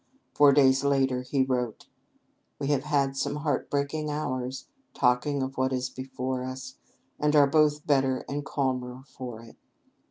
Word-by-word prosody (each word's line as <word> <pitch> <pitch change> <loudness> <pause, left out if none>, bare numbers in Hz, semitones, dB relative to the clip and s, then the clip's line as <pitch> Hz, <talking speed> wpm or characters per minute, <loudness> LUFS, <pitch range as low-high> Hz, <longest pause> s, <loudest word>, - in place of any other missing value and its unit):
Four 145 -1 +6
days 135 -1 +4
later 135 -2 +2
he 130 +1 0
wrote: 125 -4 -2 0.7
"We 140 -1 -3
have 145 -1 +1
had 140 -2 +1
some 140 +1 -1
heart 150 0 -2
breaking 145 +2 -1
hours, 130 -3 -3 0.3
talking 130 +2 +2
of 130 0 -5
what 130 0 +1
is 130 0 -2
before 130 0 -4
us, 130 0 -6 0.5
and 150 +1 +2
are 145 -1 +7
both 150 0 +2
better 135 -3 +1
and 145 +1 -3
calmer 130 -2 -2
for 120 -5 -8
it." 115 - -15
135 Hz, 155 wpm, -27 LUFS, 130-145 Hz, 0.7 s, are